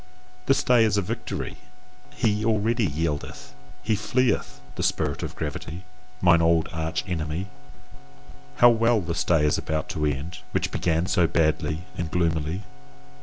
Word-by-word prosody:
This 135 - +3
day 125 -2 +5
is 105 -2 +2
a - - +3
victory: - - -4 0.6
he 105 -3 +1
already 110 0 +2
yieldeth, 75 -1 -4 0.3
he 110 - +1
fleeth, 120 +5 0
THE - - -5
SPIRIT - - 0
OF - - -5
GRAVITY, 85 +3 -5 0.4
mine 85 -2 +5
old 80 -1 +3
arch 80 0 -2
enemy! 85 +2 -3 1.1
How 120 0 +7
well 115 0 +3
this 85 -1 -2
day 80 -3 +3
is 75 - +2
about 80 -1 -3
to 75 - -3
end, 75 +6 -3
which - - 0
began 85 0 0
so 90 -3 +3
badly 80 0 0 0.2
and 85 -2 -2
gloomily! 80 +2 -1
85 Hz, 145 wpm, -25 LUFS, 80-105 Hz, 1.1 s, How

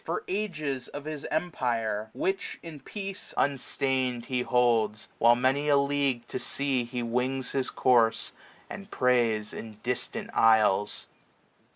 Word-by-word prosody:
For 165 - -3
ages, 155 -10 -2
of 145 0 -8
his 155 -2 -5
empire; 115 -10 -1
which, 195 +1 -2
in 160 -3 -8
peace, 195 +4 -5
760 140 0 0
30 135 - +2
SPRING. - - +4 0.3
Unstain*d 115 - -15
he 125 -1 +1
holds, 115 -4 +2
while 120 0 +6
many 135 +4 +1
a 145 - +6
league 140 -3 +1
to - - -3
sea 135 -3 -1
He 120 0 -4
wings 125 +2 -1
his 135 -2 0
course, 120 -3 +3 0.4
and 195 +1 -9
preys 120 - +1
in 110 -2 -8
distant 125 0 -3
isles. 105 -2 +4
130 Hz, 150 wpm, -28 LUFS, 115-145 Hz, 0.4 s, while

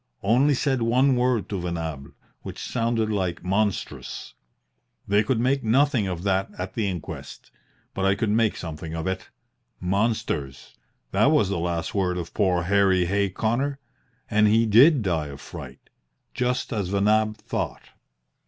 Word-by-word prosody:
Only 130 +8 +4
said 135 -1 0
one 125 +4 +3
word 125 -3 +1
to 100 -3 -3
Venables, 80 -5 -5 0.3
which - - -8
sounded 115 -2 -1
like 95 -4 -2
'Monstrous.' 100 +2 -2 0.7
They 100 +1 +4
could 110 +2 0
make 130 +2 +1
nothing 125 -1 +2
of 90 -2 -4
that 95 -1 +1
at 90 +1 -5
the 110 -3 -1
inquest. 90 -4 -7 0.4
But 95 - -1
I 95 0 +3
could 110 0 -1
make 110 0 +2
something 80 -1 -6
of 80 -1 -4
it. 95 0 -3 0.5
Monsters! 95 - -2 0.4
That 105 +6 +3
was 150 -10 +3
the 100 -3 -1
last 85 -1 -2
word 90 -3 0
of 85 -2 -6
poor 90 -4 +1
Harry 95 -1 +3
Hay 100 +2 +1
Connor. 120 +9 -1 0.5
And 105 -1 +3
he 110 +2 +4
did 125 +5 +6
die 80 -6 -1
of 70 -1 -9
fright, 70 - -11 0.4
just 125 +1 -1
as 100 -4 -1
Venables 105 +2 +2
thought. - - -4
100 Hz, 155 wpm, -25 LUFS, 90-115 Hz, 0.7 s, did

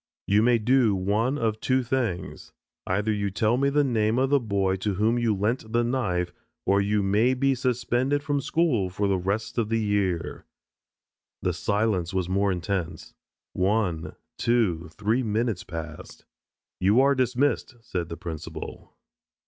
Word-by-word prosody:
"You 105 +2 +3
may 120 +1 +4
do 115 -1 +3
one 105 +8 0
of 110 -4 -1
two 130 +2 +1
things, 120 -7 -3 0.3
either 100 +4 0
you 100 -1 -1
will - - -4
tell 110 +3 +2
the 140 +3 +2
name 115 -3 +1
of 135 +1 +1
the 140 - +5
boy 100 -5 0
to 100 +1 -2
whom 110 +5 +2
you 115 -3 +1
lent 110 +3 -1
the 120 +1 +2
knife 95 -8 -1 0.3
or 100 +1 +3
you 105 +1 +1
may 110 +6 +3
be 135 +1 +2
suspended 130 +2 0
from 145 -1 0
school 130 - +1
for 100 +2 -1
the 95 -1 +1
rest 105 +6 -2
of 110 -2 0
the 115 0 +1
year." 100 -5 -1 1.0
The - - +1
silence 100 -4 0
was 95 -2 0
more 100 +2 +1
intense. 95 -1 -3 0.4
One, 90 -4 0 0.2
two, 100 -9 +1
three 105 +8 0
minutes 110 -4 -1
passed. 80 -4 -8 0.5
"You 100 +6 +4
are 140 +1 +4
dismissed," 130 0 0
said 90 -6 -4
the 85 - -6
principal. 80 -2 -8
105 Hz, 155 wpm, -26 LUFS, 95-120 Hz, 1.0 s, the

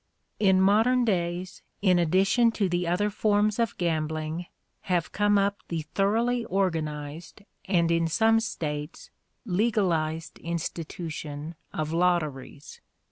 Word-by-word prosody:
In 190 -3 +4
modern 225 +6 +4
days, 180 -2 -2 0.2
in 180 -3 +4
addition 195 +8 +3
to 200 -3 +1
the 175 -1 -1
other 205 +5 +1
forms 210 +1 +1
of 230 -2 0
gambling, 160 0 -2 0.4
have 175 -2 0
come 205 0 +2
up 200 0 +1
the 165 -2 -3
thoroughly 230 +5 +1
organized 160 -3 -3 0.2
and, 170 -3 +2
in 165 0 +2
some 225 +6 +3
States, 150 -8 -5 0.3
legalized 175 -6 0
institution 160 -2 -5 0.2
of 155 -4 -3
lotteries. 155 -6 -1
175 Hz, 115 wpm, -27 LUFS, 160-205 Hz, 0.4 s, In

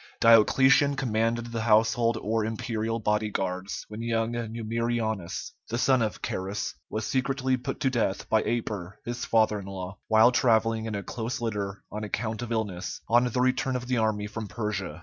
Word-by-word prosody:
Diocletian 130 +5 +6
commanded 115 -2 0
the 115 -1 -2
household 115 +1 +3
or 110 +1 0
imperial 115 0 -2
body 105 0 0
guards 95 -1 -3
when 105 +1 -7
young 115 0 0
Numerianus, 115 -3 -2 0.2
the 115 - -1
son 130 0 +3
of 110 -2 -2
Carus, 95 +2 -3 0.2
was 110 -1 -3
secretly 130 0 0
put 125 -1 -5
to 135 - +2
death 110 -6 -1
by 110 -1 +3
Aper 105 -5 -3
his 120 0 -3
father 110 -2 +3
in 95 - -9
law, 95 0 -6
while 110 +3 +6
travelling 115 -2 +2
in 110 -2 -3
a 100 - -3
close 120 +1 -4
litter 105 -4 -3
on 105 +1 -4
account 110 +2 -3
of 120 -1 -5
illness, 105 -5 -3
on 120 +2 +5
the 125 +1 0
return 130 +1 +1
of 125 -1 -3
the 125 -1 +1
army 110 -2 0
from 110 +1 -5
Persia. 105 -4 -4
115 Hz, 175 wpm, -27 LUFS, 105-120 Hz, 0.2 s, Diocletian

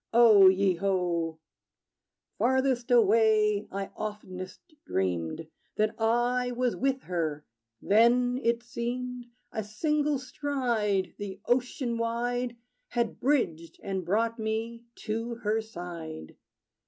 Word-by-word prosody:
O 220 -5 +8
ye 190 0 +4
ho! 175 -4 0 1.0
Farthest 260 -1 +1
away, 215 -2 +4
I 195 0 -4
oftenest 185 -3 -6 0.2
dreamed 90 - -2 0.3
That 215 0 +1
I 240 +2 +2
was 245 0 0
with 265 0 0
her. 155 -4 -2 0.4
Then, 245 +4 +4
it 235 -1 +1
seemed 245 0 -4 0.2
A 220 - -3
single 295 +7 0
stride 240 -7 -1
the 200 -2 -6
ocean 245 -1 0
wide 240 +1 -1 0.3
Had 235 -2 -2
bridged, 170 - 0
and 190 -1 -3
brought 225 +6 0
me 225 +2 -3 0.2
to 230 +2 -3
her 220 -1 0
side. 170 -6 -8
225 Hz, 105 wpm, -28 LUFS, 195-245 Hz, 1.0 s, O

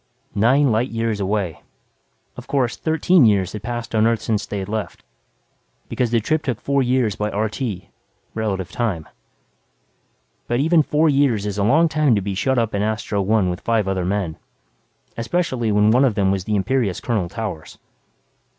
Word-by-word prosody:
Nine 130 +6 +3
light 115 +4 +1
years 115 -2 -2
away. 100 -3 -2 0.7
Of - - -10
course, 125 -4 0
thirteen 160 +1 +3
years 100 -4 +3
had 105 - -6
passed 120 +1 -5
on 110 0 +3
Earth 115 -1 +1
since 105 -2 -1
they 105 - -4
had 95 -1 -4
left, 105 -6 -5 0.9
because 125 - 0
the 115 0 +2
trip 155 +8 0
took 125 -8 -3
four 140 +5 +1
years 125 -4 +1
by 105 0 -2
RT 105 +5 -3 0.7
relative 100 -5 -3
time. 100 -10 -2 1.4
But 120 +1 0
even 160 +3 +4
four 150 +2 +2
years 135 -8 +2
is 105 0 -3
a - - +2
long 155 +10 +4
time 155 -6 +2
to 100 - 0
be 100 +1 -3
shut 130 +7 0
up 115 -2 0
in 100 - 0
Astro 105 -1 -1
One 100 -2 +2
with 90 - -6
five 115 -4 0
other 95 -2 -1
men, 90 -3 -2 0.8
especially 120 -3 -1
when 105 +1 +4
one 125 +4 +4
of 125 -6 +2
them 95 -1 +2
was 95 -1 -2
the 105 - 0
imperious 105 -1 0
Colonel 105 -8 -1
Towers. 100 -7 -6
110 Hz, 180 wpm, -21 LUFS, 100-130 Hz, 1.4 s, even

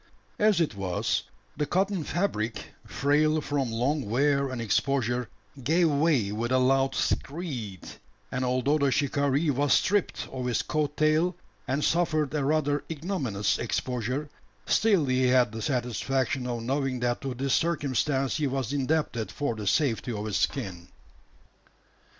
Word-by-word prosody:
As 210 -3 +4
it 165 -7 +1
was, 95 -3 -1 0.3
the 150 0 -1
cotton 190 0 0
fabric 115 - -2 0.2
frail 150 +2 +2
from 145 -5 -1
long 125 +1 -1
wear 140 +3 +2
and 130 -2 -4
exposure 120 +1 0 0.3
gave 165 +4 +3
way 140 -8 +2
with 115 +3 -2
a 130 - +4
loud 135 +1 +2
"screed;" 130 - -3 0.4
and 130 +1 -1
although 130 +4 +1
the 140 -1 +3
shikaree 140 +2 +1
was 145 +1 +2
stripped 205 -1 +1
of 130 -1 -3
his 120 - 0
coat 150 -1 -1
tail, 155 +4 +2 0.3
and 140 +3 0
suffered 155 -4 +1
a 150 -2 0
rather 145 0 +1
ignominious 145 - -1
exposure, 125 +4 -2 0.4
still 200 -8 +3
he 130 -1 +2
had 125 -3 +4
the 110 0 -6
satisfaction 125 +1 -1
of 120 -2 -3
knowing 135 0 -1
that 120 -1 0
to 135 -2 -4
this 135 +2 -1
circumstance 140 -4 +1
he 150 -2 0
was 135 0 -2
indebted 140 -5 -1
for 145 -4 -2
the 105 -2 -5
safety 125 0 +1
of 105 -2 -4
his 105 - -1
skin. 95 - -2
135 Hz, 145 wpm, -27 LUFS, 125-150 Hz, 0.4 s, As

